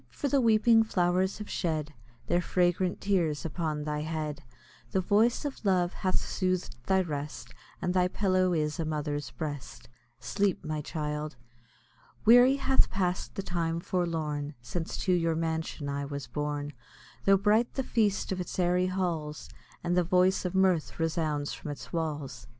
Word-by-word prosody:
for 285 - -3
the 280 -1 +3
weeping 225 0 +5
flowers 185 -2 +1
have 210 0 -7
shed 155 -3 -2 0.3
Their 175 - +2
fragrant 180 +1 +1
tears 170 -7 +1
upon 155 -2 -2
thy 150 0 -2
head, 155 -1 -3 0.5
The - - +3
voice 215 - +2
of 280 -4 -5
love 185 -3 +2
hath 185 -2 -1
sooth'd 185 -5 -1
thy 190 0 +4
rest, 145 -7 -5 0.3
And 180 - +1
thy 180 -1 +3
pillow 185 -1 +2
is 150 -2 0
a - - +1
mother's 150 -2 -2
breast. 145 -6 -6 0.3
Sleep, 200 -2 0
my 155 -1 -2
child! 150 0 -4 0.9
Weary 245 +4 +8
hath 270 -1 +3
pass'd 180 -2 -1
the 195 - -3
time 170 -2 -1
forlorn, 160 -5 -2
Since 160 +8 -4
to 185 - +3
your 165 -2 +2
mansion 160 -2 -2
I 140 0 -2
was 140 -1 -5
borne, 145 +3 -3 0.5
Tho' 195 0 +6
bright 215 +4 +3
the 265 - 0
feast 210 -6 +1
of 185 -1 -1
its 180 - -6
airy 180 0 +2
halls, 170 -5 -3 0.3
And 175 +1 +1
the 180 - +4
voice 185 +2 +3
of 180 +1 -2
mirth 185 -5 +2
resounds 155 -3 -1
from - - -7
its 145 +4 -8
walls. 155 -4 -3
175 Hz, 160 wpm, -29 LUFS, 150-190 Hz, 0.9 s, Weary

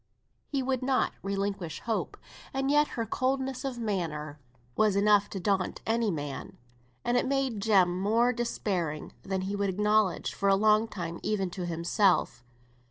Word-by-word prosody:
He 275 -2 -1
would 260 -1 -1
not 260 0 +1
relinquish 195 -4 -3
hope, 225 -2 -2 0.4
and 270 +1 +1
yet 295 0 +4
her 230 - 0
coldness 260 +3 -1
of 265 -3 -3
manner 160 -9 -3 0.4
was 215 -2 +3
enough 205 0 +4
to 195 - -5
daunt 190 0 -1
any 225 0 +1
man; 145 -5 -5 0.5
and 240 +1 +2
it - - +1
made 265 -6 0
Jem 185 -4 +3
more 230 +5 +3
despairing 185 -10 -2
than 190 -1 -2
he 195 +2 -3
would 200 -1 0
acknowledge 210 -1 +1
for 200 - +1
a 195 - +6
long 215 +2 +4
time 170 -5 -5
even 195 -4 -1
to 180 -1 -4
himself. 170 - +1
205 Hz, 160 wpm, -29 LUFS, 185-235 Hz, 0.5 s, a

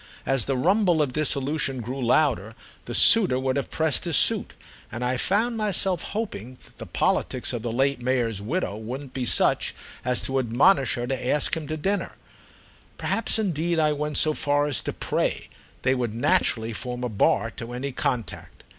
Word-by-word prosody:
As 135 -4 +1
the 135 -1 -1
rumble 180 +3 +2
of 145 -4 0
dissolution 140 -2 -1
grew 125 +3 -5
louder 120 -4 +1 0.3
the 120 - -5
suitor 195 - +6
would 130 0 -1
have 140 - -2
pressed 160 0 0
his 170 -3 0
suit, - - +2 0.4
and 120 +2 -4
I 125 +1 0
found 220 - +1
myself 195 -3 0
hoping 130 - -5 0.2
the - - -8
politics 130 0 -1
of 120 - -3
the 115 0 -3
late 135 +2 0
Mayor's 120 -5 -1
widow 125 - -2
wouldn't 125 +5 -7
be 130 -2 -3
such - - +2 0.3
as 125 0 0
to 135 0 0
admonish 130 +4 +3
her 120 - -3
to 125 0 -3
ask 145 +2 +1
him 160 -2 -6
to 155 - -3
dinner; 195 +6 -2 0.8
perhaps 225 - 0
indeed 170 -5 -1
I 155 -1 +2
went 150 0 -2
so 155 - +4
far 145 -1 +1
as 145 -4 +1
to - - -4
pray, - - -2 0.3
they 130 - +3
would 120 -4 -2
naturally 115 -1 +1
form 125 +3 -5
a - - 0
bar 110 +1 +1
to 115 +1 -8
any 130 +3 -4
contact. 125 -2 -4
135 Hz, 180 wpm, -24 LUFS, 120-155 Hz, 0.8 s, suitor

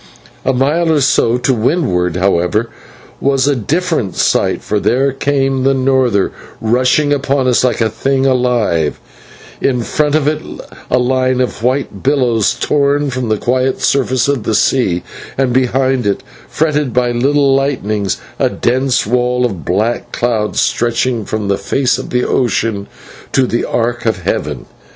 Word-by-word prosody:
A 135 - +2
mile 150 +6 +1
or 155 - +3
so 125 -3 +2
to 130 +2 +1
windward, 110 - 0
however, 95 +4 +1 0.5
was 135 0 +1
a 145 - +2
different 150 - -1
sight, - - +1
for 105 - -1
there 135 +6 +1
came 135 -1 0
the 135 +1 +2
norther, 130 -6 +1 0.3
rushing 125 +6 +2
upon 140 -2 0
us 125 -1 +3
like 125 -1 +1
a 115 - +3
thing 135 +4 0
alive; 120 - +1 0.6
in 125 -3 +1
front 150 +4 0
of 150 -2 +1
it 155 0 0 0.5
a - - +2
line 130 0 +1
of 125 -3 -2
white 125 -4 -1
billows 125 -6 +1
torn 145 -1 +1
from 125 -2 -3
the 110 - +1
quiet 130 +4 0
surface 130 -2 +1
of 140 -4 0
the 110 +1 -1
sea, 95 -8 +1 0.3
and 130 -2 +1
behind 130 -1 +1
it, 100 - -1 0.3
fretted 150 -5 0
by 125 -1 +2
little 135 +3 +2
lightnings, 110 -8 -1 0.2
a - - +2
dense 130 +1 0
wall 125 +2 +1
of 95 -10 -4
black 105 - -1
cloud 110 -3 -1
stretching 120 -1 0
from 110 0 -3
the 100 0 0
face 125 +5 0
of 130 - -7
ocean 115 -4 0 0.4
to 130 - +3
the 120 -1 -1
arc 120 0 -1
of 100 -5 -1
heaven. - - -2
125 Hz, 155 wpm, -15 LUFS, 115-135 Hz, 0.6 s, or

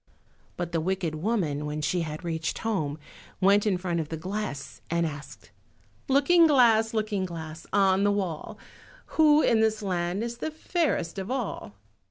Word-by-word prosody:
But 175 -1 -3
the 165 -2 0
wicked 180 -2 -1
woman 155 -5 -1
when 150 +1 -3
she 180 +3 0
had 155 +1 -5
reached 160 -2 -2
home 160 -10 -2 0.4
went 200 +2 +4
in 190 -3 +2
front 175 -2 -2
of 155 -2 -4
the 160 - -4
glass 185 -4 -5
and 170 0 +1
asked— 140 -8 -8 0.6
"Looking 325 +5 +5
glass, 230 -6 +4
Looking 215 -3 0
glass, 160 -3 -7
on 195 -1 +3
the 205 - +4
wall, 185 -6 -3 0.6
Who 305 -1 +6
in 230 - +3
this 220 -1 +1
land 180 +1 -1
is 235 0 -5
the - - -2
fairest 310 - -1
of 190 +2 -5
all?" 240 - -4
190 Hz, 165 wpm, -27 LUFS, 160-220 Hz, 0.6 s, Who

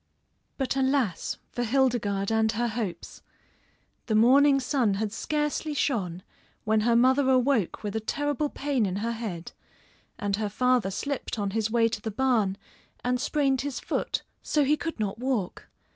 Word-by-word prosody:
But 270 -1 -1
alas, 265 - 0
for 245 - -2
Hildegarde 225 -5 +1
and 220 0 +2
her 240 +2 0
hopes! 215 -7 -5 0.9
The 220 - +1
morning 275 +5 +6
sun 250 -6 +1
had 210 +1 -2
scarcely 300 +3 -2
shone 185 - -1 0.4
when 220 0 +2
her 230 +2 +2
mother 260 +3 +4
awoke 255 -7 +2
with 205 0 -4
a - - +1
terrible 290 +5 -1
pain 275 -8 0
in 185 - -3
her 235 - 0
head, 210 -8 -5 0.7
and 200 -1 -1
her 210 -1 -2
father 250 -1 +2
slipped 275 +4 -3
on 200 -2 -1
his 220 +1 0
way 230 0 +3
to 220 - -4
the 220 - -3
barn 220 -4 +1 0.5
and 250 0 0
sprained 275 -3 +1
his 280 -3 -4
foot - - -2 0.2
so 300 - +1
he 290 +2 +3
could 330 -4 -5
not 210 0 -2
walk. 245 -8 -2
235 Hz, 160 wpm, -27 LUFS, 210-270 Hz, 0.9 s, morning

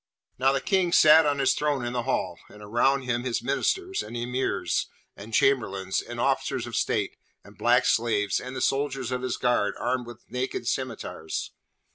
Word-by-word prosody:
Now, 135 +1 +4
the 135 - +1
King 190 -3 +1
sat 155 -1 +7
on 145 -1 +1
his 135 -2 +3
throne 145 -4 -1
in 120 - -3
the 125 - 0
Hall, - - -2
and 105 0 -13
around 125 +6 +2
him 120 -1 -1
his 120 -2 -2
ministers, 370 - 0
and 120 - -7
Emirs, 125 +2 -1 0.3
and 105 +3 -10
chamberlains, 100 -7 +1
and - - -8
officers - - 0
of - - -6
state, - - -1 0.3
and - - -16
black 125 +1 +3
slaves, 110 -3 +1
and 125 +1 -7
the - - -4
soldiers 135 -3 0
of 125 0 -2
his 130 -2 -2
guard 110 -5 +1
armed 125 0 -2
with 120 0 -12
naked 125 -1 -3
scimitars. 110 -12 -4
125 Hz, 180 wpm, -26 LUFS, 115-135 Hz, 0.3 s, sat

